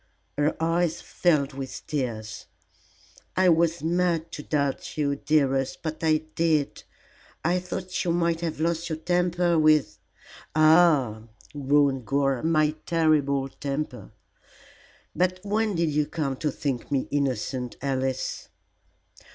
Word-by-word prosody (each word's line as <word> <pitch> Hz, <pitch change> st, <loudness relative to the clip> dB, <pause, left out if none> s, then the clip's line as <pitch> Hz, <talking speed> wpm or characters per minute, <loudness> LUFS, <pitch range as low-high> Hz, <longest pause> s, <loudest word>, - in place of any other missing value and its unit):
Her 145 Hz, +2 st, +1 dB
eyes 165 Hz, 0 st, +1 dB
filled 150 Hz, -5 st, +1 dB
with 135 Hz, -1 st, -6 dB
tears. 115 Hz, -8 st, -4 dB, 0.9 s
"I 185 Hz, -1 st, +5 dB
was 165 Hz, -1 st, +2 dB
mad 170 Hz, -1 st, 0 dB
to -, -, -6 dB
doubt 140 Hz, -1 st, -2 dB
you, 140 Hz, -2 st, +1 dB
dearest, 135 Hz, -3 st, 0 dB
but 160 Hz, 0 st, -4 dB
I 155 Hz, -1 st, +2 dB
did. 160 Hz, -4 st, +1 dB, 0.6 s
I 175 Hz, +2 st, +2 dB
thought 180 Hz, 0 st, -4 dB
you 175 Hz, -, -1 dB
might 170 Hz, -1 st, +1 dB
have 165 Hz, -3 st, -3 dB
lost 170 Hz, +1 st, -1 dB
your 160 Hz, -, -2 dB
temper 175 Hz, 0 st, +1 dB
with 155 Hz, -8 st, +3 dB, 0.3 s
" -, -, -19 dB
"Ah!" 155 Hz, -9 st, +4 dB, 0.3 s
groaned 140 Hz, -3 st, +2 dB
Gore, 135 Hz, -2 st, +1 dB
"my 155 Hz, -2 st, +2 dB, 0.2 s
terrible 150 Hz, -5 st, +2 dB
temper. 140 Hz, +2 st, -5 dB, 1.0 s
But 185 Hz, +1 st, +1 dB
when 210 Hz, 0 st, 0 dB
did 165 Hz, -2 st, +1 dB
you 150 Hz, 0 st, +1 dB
come 145 Hz, -5 st, -2 dB
to 150 Hz, -, -1 dB
think 135 Hz, -2 st, -3 dB
me 135 Hz, -2 st, 0 dB
innocent, 130 Hz, -3 st, -2 dB
Alice?" 130 Hz, -1 st, -2 dB
155 Hz, 125 wpm, -26 LUFS, 140-170 Hz, 1.0 s, I